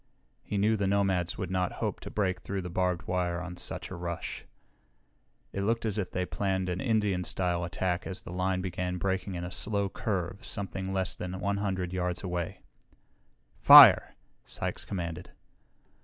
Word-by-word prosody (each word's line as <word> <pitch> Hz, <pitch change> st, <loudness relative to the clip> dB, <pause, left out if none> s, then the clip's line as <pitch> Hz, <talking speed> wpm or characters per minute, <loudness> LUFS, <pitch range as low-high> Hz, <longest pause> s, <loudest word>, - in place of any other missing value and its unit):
He 105 Hz, -, -4 dB
knew 105 Hz, +3 st, +3 dB
the 100 Hz, -1 st, 0 dB
nomads 95 Hz, -3 st, +1 dB
would 95 Hz, -1 st, -4 dB
not 90 Hz, -1 st, 0 dB
hope -, -, -3 dB
to -, -, -8 dB
break 95 Hz, -3 st, -1 dB
through 95 Hz, -1 st, -4 dB
the 90 Hz, -, -6 dB
barbed 90 Hz, -1 st, 0 dB
wire 90 Hz, -1 st, -1 dB
on 90 Hz, 0 st, -6 dB
such 90 Hz, -, -5 dB
a -, -, -5 dB
rush. 85 Hz, -1 st, -5 dB, 1.1 s
It 100 Hz, -, -2 dB
looked 115 Hz, +3 st, 0 dB
as 110 Hz, -1 st, -1 dB
if 95 Hz, -, -2 dB
they 90 Hz, 0 st, -2 dB
planned 95 Hz, -1 st, -1 dB
an 90 Hz, 0 st, -2 dB
Indian 105 Hz, -7 st, +1 dB
style 90 Hz, -1 st, -1 dB
attack 90 Hz, +1 st, -2 dB
as 95 Hz, -, -5 dB
the -, -, -8 dB
line 95 Hz, 0 st, 0 dB
began 90 Hz, 0 st, -3 dB
breaking 95 Hz, 0 st, -2 dB
in 85 Hz, -, -4 dB
a 90 Hz, -, -5 dB
slow 100 Hz, 0 st, -1 dB
curve 95 Hz, -2 st, -3 dB
something 95 Hz, -1 st, -4 dB
less 95 Hz, -1 st, 0 dB
than 90 Hz, +1 st, -4 dB
100 95 Hz, -3 st, -1 dB
yards 90 Hz, -1 st, -2 dB
away. 90 Hz, -2 st, -3 dB, 1.0 s
"Fire!" -, -, +9 dB, 0.3 s
Sykes -, -, -4 dB
commanded. 85 Hz, -4 st, -5 dB
95 Hz, 170 wpm, -29 LUFS, 90-100 Hz, 1.1 s, Fire